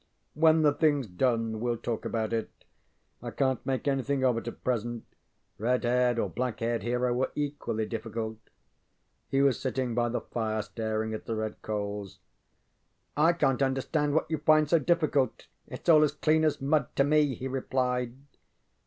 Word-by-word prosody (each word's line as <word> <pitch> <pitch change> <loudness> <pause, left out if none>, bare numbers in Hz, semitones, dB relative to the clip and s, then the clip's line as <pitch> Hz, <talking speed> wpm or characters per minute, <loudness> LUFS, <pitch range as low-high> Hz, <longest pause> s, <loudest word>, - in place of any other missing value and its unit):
ŌĆ£When 160 +1 +5
the 145 -1 +4
thingŌĆÖs 145 - +1
done 115 -1 0
weŌĆÖll 120 -1 -1
talk 115 -2 -3
about 110 -1 -2
it. 115 -1 -1 0.7
I - - -5
canŌĆÖt 130 -3 0
make 135 +2 -2
anything 135 0 0
of 125 -2 +3
it 115 - -11
at 120 - -7
present. 120 -1 -2 0.6
Red 125 +4 +1
haired 125 0 +2
or - - +1
black 125 -3 -3
haired 115 -1 -1
hero 125 +2 0
are - - 0
equally 145 -7 -2
difficult. 110 0 -4
ŌĆØ 110 - -35 0.8
He 135 - +1
was 135 -3 +3
sitting 130 -2 -2
by 120 0 +1
the 120 - -2
fire 110 -2 -2
staring 110 +1 -3
at 110 - -6
the 115 - -2
red 110 -1 -4
coals. 105 -2 -4 1.0
ŌĆ£_I_ 165 +3 +3
canŌĆÖt 135 -3 +2
understand 145 +3 0
what 160 - +2
you 160 - 0
find 155 0 +4
so 165 +2 +4
difficult. 150 -5 +1 0.2
ItŌĆÖs 170 - +2
all 155 -1 +7
as 150 - +2
clean 155 +1 +2
as 155 - +1
mud 140 -1 +1
to 140 - +4
me, 145 -2 +3
ŌĆØ - - -14
he 130 - -4
replied. 125 -2 -1
125 Hz, 180 wpm, -28 LUFS, 115-145 Hz, 1.0 s, all